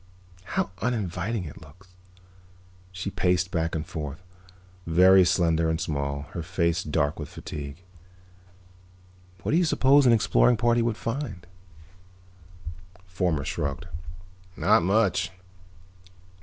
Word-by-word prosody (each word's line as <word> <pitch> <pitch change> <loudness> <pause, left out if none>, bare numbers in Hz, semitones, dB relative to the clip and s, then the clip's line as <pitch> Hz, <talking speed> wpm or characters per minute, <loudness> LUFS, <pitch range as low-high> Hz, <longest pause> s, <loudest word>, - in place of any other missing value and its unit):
"How - - 0
uninviting 105 -2 -2
it 75 - -10
looks." 85 +5 -17 1.0
She 90 +2 -5
paced 90 0 +1
back 80 -1 -1
and 80 0 -3
forth, 75 +1 -6 0.6
very 95 +3 +6
slender 85 -2 +2
and 80 0 -1
small, 70 -1 -2
her 85 - -4
face 85 -1 0
dark 75 -1 -1
with 75 - -6
fatigue. 70 +3 -8 1.6
"What - - -1
do 160 - +4
you - - +3
suppose 140 -3 +4
an - - +6
exploring 115 +1 +4
party 120 +1 +2
would 115 -2 -1
find?" 115 - -4 1.6
Fomar 90 -6 -1
shrugged. 75 0 -3 0.7
"Not - - +4
much. 90 -2 +2
90 Hz, 115 wpm, -26 LUFS, 80-105 Hz, 1.6 s, very